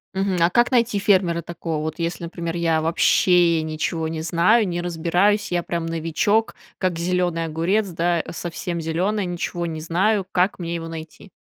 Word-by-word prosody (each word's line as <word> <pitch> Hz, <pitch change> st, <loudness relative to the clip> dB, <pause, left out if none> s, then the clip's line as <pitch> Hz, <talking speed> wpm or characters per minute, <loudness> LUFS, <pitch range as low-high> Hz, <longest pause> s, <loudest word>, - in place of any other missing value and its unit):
Мгм. 190 Hz, -1 st, 0 dB
А 170 Hz, -, +5 dB
как 240 Hz, +7 st, +3 dB
найти 235 Hz, -3 st, +2 dB
фермера 185 Hz, -4 st, +2 dB
такого 165 Hz, -2 st, -4 dB
вот, 155 Hz, +2 st, -4 dB
если, 170 Hz, +1 st, -3 dB
например, 170 Hz, 0 st, -4 dB
я 165 Hz, -2 st, +1 dB
вообще 170 Hz, +1 st, +3 dB
ничего 160 Hz, +1 st, -2 dB
не 160 Hz, 0 st, -4 dB
знаю, 180 Hz, +7 st, +3 dB
не 175 Hz, -2 st, -2 dB
разбираюсь, 175 Hz, +5 st, +1 dB
я 175 Hz, 0 st, +1 dB
прям 170 Hz, -1 st, -3 dB
новичок, 165 Hz, +7 st, 0 dB, 0.2 s
как 185 Hz, -3 st, -1 dB
зеленый 175 Hz, -1 st, 0 dB
огурец, 170 Hz, +7 st, 0 dB
да, 170 Hz, -1 st, 0 dB
совсем 175 Hz, +1 st, -4 dB
зеленая, 185 Hz, +6 st, -1 dB
ничего 175 Hz, 0 st, -3 dB
не 160 Hz, -2 st, -4 dB
знаю. 190 Hz, +5 st, +1 dB
Как 185 Hz, +2 st, +1 dB
мне 170 Hz, -2 st, -4 dB
его 165 Hz, -1 st, -5 dB
найти? 160 Hz, +4 st, -9 dB
170 Hz, 170 wpm, -22 LUFS, 165-185 Hz, 0.2 s, А